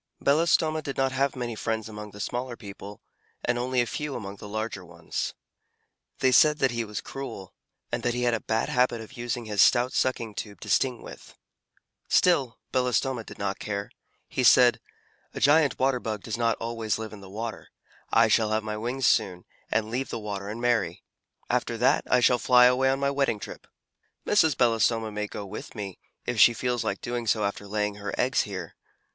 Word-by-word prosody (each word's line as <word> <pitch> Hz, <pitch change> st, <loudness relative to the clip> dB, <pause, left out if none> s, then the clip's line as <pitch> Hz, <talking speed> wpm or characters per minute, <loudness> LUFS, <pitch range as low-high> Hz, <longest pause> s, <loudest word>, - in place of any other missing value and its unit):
Belostoma 155 Hz, +1 st, +2 dB
did 140 Hz, -3 st, -6 dB
not 135 Hz, 0 st, +2 dB
have 135 Hz, +1 st, 0 dB
many 120 Hz, -2 st, -3 dB
friends 110 Hz, 0 st, -3 dB
among 105 Hz, -1 st, -8 dB
the 105 Hz, -, -13 dB
smaller 120 Hz, +3 st, -3 dB
people, 100 Hz, -1 st, -10 dB, 0.4 s
and 120 Hz, 0 st, +1 dB
only 125 Hz, 0 st, +1 dB
a -, -, +1 dB
few 150 Hz, +4 st, -4 dB
among 100 Hz, -3 st, -6 dB
the 105 Hz, -, -10 dB
larger 110 Hz, -2 st, -4 dB
ones. 90 Hz, 0 st, -5 dB, 0.9 s
They 130 Hz, -, +4 dB
said 150 Hz, +3 st, +6 dB
that 135 Hz, -4 st, +2 dB
he 120 Hz, -1 st, -1 dB
was 105 Hz, -2 st, -5 dB
cruel, 135 Hz, -9 st, -7 dB, 0.4 s
and -, -, -1 dB
that 120 Hz, 0 st, 0 dB
he 125 Hz, -, -1 dB
had 120 Hz, -1 st, +2 dB
a 115 Hz, -, 0 dB
bad 110 Hz, +1 st, -1 dB
habit 125 Hz, -2 st, +2 dB
of 115 Hz, +3 st, -10 dB
using 120 Hz, -1 st, -4 dB
his 105 Hz, -2 st, +1 dB
stout 125 Hz, +1 st, +4 dB
sucking 120 Hz, -4 st, 0 dB
tube 100 Hz, -2 st, -7 dB
to -, -, -8 dB
sting 125 Hz, -3 st, +1 dB
with. -, -, -12 dB, 0.7 s
Still, 140 Hz, -10 st, +3 dB
Belostoma 125 Hz, -1 st, 0 dB
did -, -, -11 dB
not 100 Hz, 0 st, -3 dB
care; 100 Hz, -1 st, -4 dB, 0.4 s
he 130 Hz, -, -2 dB
said, 125 Hz, 0 st, +6 dB, 0.6 s
"A -, -, -3 dB
Giant 145 Hz, 0 st, +4 dB
Water 130 Hz, -1 st, +2 dB
Bug 110 Hz, -4 st, -4 dB
does 110 Hz, -, -3 dB
not 115 Hz, -1 st, +1 dB
always 115 Hz, -2 st, -2 dB
live 110 Hz, -1 st, -6 dB
in 105 Hz, -, -10 dB
the 95 Hz, -, -12 dB
water. 110 Hz, +3 st, -6 dB, 0.4 s
I -, -, +5 dB
shall 110 Hz, -2 st, +3 dB
have 110 Hz, 0 st, 0 dB
my 105 Hz, 0 st, -4 dB
wings 120 Hz, +4 st, -2 dB
soon, 95 Hz, -7 st, +2 dB, 0.2 s
and 110 Hz, 0 st, 0 dB
leave 130 Hz, +3 st, -2 dB
the -, -, -3 dB
water 100 Hz, -2 st, -5 dB
and 110 Hz, +3 st, -5 dB
marry. 120 Hz, -1 st, 0 dB, 0.4 s
After -, -, -1 dB
that, -, -, +3 dB
I 125 Hz, -, +4 dB
shall 125 Hz, 0 st, +4 dB
fly 125 Hz, 0 st, +6 dB
away 130 Hz, +1 st, +4 dB
on 135 Hz, +1 st, +1 dB
my 140 Hz, 0 st, +1 dB
wedding 135 Hz, -5 st, +1 dB
trip. -, -, -9 dB, 0.6 s
Mrs. 160 Hz, -9 st, +3 dB
Belostoma 115 Hz, -2 st, +2 dB
may 105 Hz, 0 st, -3 dB
go 105 Hz, 0 st, -7 dB
with 100 Hz, +2 st, -8 dB
me, 100 Hz, -4 st, -6 dB, 0.3 s
if 120 Hz, -2 st, -2 dB
she 120 Hz, -, +7 dB
feels 125 Hz, 0 st, -1 dB
like 100 Hz, -, -3 dB
doing 120 Hz, -1 st, -3 dB
so 105 Hz, 0 st, +2 dB
after 100 Hz, 0 st, -3 dB
laying 105 Hz, 0 st, -1 dB
her 105 Hz, 0 st, -5 dB
eggs -, -, +2 dB
here. -, -, -6 dB
115 Hz, 200 wpm, -27 LUFS, 105-125 Hz, 0.9 s, she